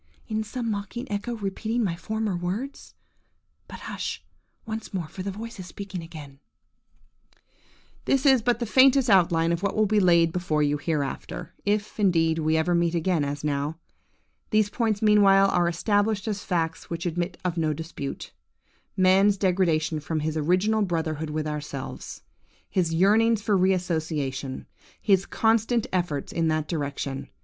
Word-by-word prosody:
Is 220 -1 -2
some 230 0 -3
mocking 205 +4 -4
echo 205 +4 -2
repeating 220 +3 -2
my 175 -5 -1
former 220 +1 -2
words? 195 +11 -5 0.7
But, - - -10
hush - - -5 0.4
once 220 -2 -6
more, 175 -4 -2
for 185 - -8
the 195 - -3
voice 220 +2 -7
is 180 - -7
speaking 195 0 -7
again:– 150 -4 -11 1.7
"This 275 +1 +1
is 265 -3 +6
but 240 +1 +1
the 235 - -2
faintest 260 +1 +5
outline 170 -3 +4
of 170 0 -1
what 200 -1 -1
will 215 - +3
be 210 +1 +2
laid 170 -3 +4
before 160 -4 0
you 145 0 +1
hereafter, 155 +2 -3
if, 210 +1 -1
indeed, 165 -5 +2
we 155 0 +1
ever 165 +2 +1
meet 170 0 +1
again 170 -2 +1
as 145 0 -4
now. 145 +1 -1 0.7
These 215 -2 +2
points 220 -3 0
meanwhile 195 -2 +6
are 175 -1 +2
established 205 +4 0
as 205 -2 -3
facts 165 -3 -2
which 170 +1 -4
admit 175 +2 -2
of 175 -2 0
no 160 -2 +1
dispute:–man's 185 +5 -1
degradation 175 -5 +1
from 155 +1 -3
his 155 +1 -2
original 185 +8 +2
brotherhood 160 -4 -2
with 155 0 -2
ourselves; 150 -3 -6 0.4
his 175 -4 0
yearnings 210 +5 +3
for 210 -2 +2
re 190 0 +4
association; 155 -7 -2 0.3
his 195 -2 +2
constant 225 +1 +2
efforts 170 -6 -1
in 165 -1 +1
that 155 -1 0
direction. 140 -4 -4
180 Hz, 155 wpm, -26 LUFS, 160-210 Hz, 1.7 s, is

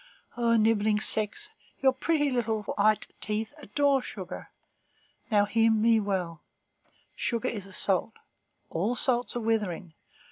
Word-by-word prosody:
O 235 -1 +2
nibbling 215 -1 +3
sex, 220 - -1 0.3
your 265 -1 +4
pretty 295 +1 +1
little 225 -3 0
white 210 +1 +1
teeth 215 +3 -3
adore 280 +2 +2
sugar. 195 -8 -8 0.8
Now, 205 -3 +4
heed 225 +2 +3
me 225 +1 +4
well, 185 -6 -2 0.7
sugar 240 +1 -1
is 205 -4 -5
a - - -13
salt. 195 +4 0 0.6
All 205 +9 0
salts 245 -1 0
are 240 - -1
withering. 205 -7 -1
220 Hz, 130 wpm, -28 LUFS, 205-245 Hz, 0.8 s, your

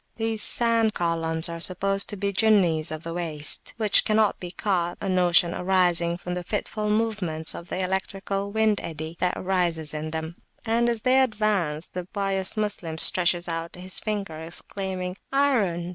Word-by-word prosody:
These 225 -1 -2
sand 230 -2 +1
columns 165 -1 +1
are 170 0 -6
supposed 195 +3 +1
to 205 - -4
be 200 +1 -2
Jinnis 185 -7 +3
of 155 0 -6
the 165 - -5
Waste, 155 -4 -3
which 215 -3 +5
cannot 215 -1 +1
be 180 - -6
caught, 175 -2 -1
a - - -4
notion 180 -2 +3
arising 175 -2 +1
from 180 0 -6
the 180 - -3
fitful 210 +2 -3
movements 205 -8 0
of 170 - -9
the 190 - -2
electrical 195 +1 -3
wind 220 -1 +1
eddy 160 0 -6
that 180 0 0
raises 175 -5 0
them, 160 +2 -5 0.3
and 235 +1 +1
as 230 -2 -2
they 260 +1 +4
advance, 205 -10 +1
the 180 -1 -6
pious 195 +1 -1
Moslem 200 -7 -2
stretches 175 +1 +5
out 165 0 -5
his 185 +1 -2
finger, 200 -7 -4
exclaiming, 185 +2 -4
Iron! 220 -12 +1
185 Hz, 160 wpm, -25 LUFS, 170-210 Hz, 0.3 s, which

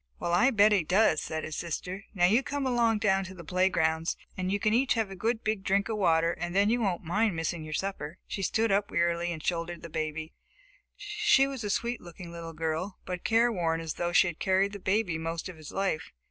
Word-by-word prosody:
"Well, 170 - -1
I 240 +9 +5
bet 215 -4 +5
he 200 -5 +3
does!" 180 -1 +3
said 160 0 -4
his 155 - -5
sister. 180 +3 -4
"Now 175 -2 +4
you 215 +8 +4
come 285 0 -3
along 235 -3 +2
down 195 -2 +2
to 185 0 -9
the 170 - -10
playgrounds, 165 -2 +1 0.2
and 185 0 -2
you 200 - +1
can 215 +1 +2
each 250 +3 +3
have 220 -4 -1
a - - -6
good 225 +4 -1
big 215 -3 -1
drink 200 +2 +1
of 220 - -1
water 165 -4 +3
and 175 +1 -5
then 200 +2 +4
you 240 +1 +1
won't 190 -5 -1
mind 200 +4 +1
missing 165 0 -2
your 155 0 -4
supper." 185 -4 -4
She 195 - -5
stood 220 +3 +1
up 200 +1 +2
wearily 170 0 0
and 160 -2 -6
shouldered 170 0 -2
the 170 - -7
baby. 155 0 -4 0.6
She 415 -9 +3
was 270 -4 -5
a 205 - -2
sweet 235 +4 -1
looking 175 0 -10
little 165 -1 -7
girl, 165 +4 -3
but 180 -1 -5
careworn 215 -8 +2
as 165 -1 -4
though 175 0 -2
she 180 - +5
had 175 -3 -4
carried 190 +1 +2
the 205 - -7
baby 190 -3 0
most 165 +1 -3
of 180 -3 -9
his 155 -2 -10
life. 195 -5 -2
185 Hz, 230 wpm, -29 LUFS, 165-215 Hz, 0.6 s, I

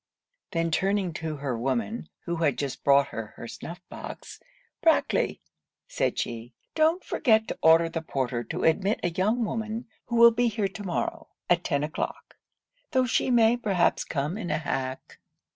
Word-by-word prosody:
Then 165 -1 -1
turning 195 +1 +1
to 160 -1 -3
her 140 -3 -3
woman, 130 - -2 0.2
who 170 -1 -2
had 145 -6 +1
just 140 -1 -4
brought 140 0 +5
her 110 -1 -6
her 115 - -7
snuff 170 +8 -8
box, - - -9 0.4
'Brackley,' 325 -1 +2 0.5
said - - -1
she, 115 +1 -4 0.2
'don't 320 +3 +2
forget 220 -6 +2
to - - -4
order 165 +1 +6
the 165 0 -3
porter 130 -6 -2
to - - -4
admit 195 +6 +2
a 175 - +1
young 215 +7 +1
woman 220 +2 -3 0.2
who 235 - -2
will 235 0 +8
be 240 +1 +2
here 215 -3 0
to 205 +2 -9
morrow, 180 -3 -3 0.2
at 175 0 +4
ten 140 -3 0
o'clock; 155 +1 -4 0.5
tho' 260 -2 +2
she 245 - +1
may 235 -1 +5
perhaps 200 -7 +1
come 150 +8 -2
in 175 - -4
a - - +1
hack.' 135 -4 -4
175 Hz, 170 wpm, -27 LUFS, 140-225 Hz, 0.5 s, will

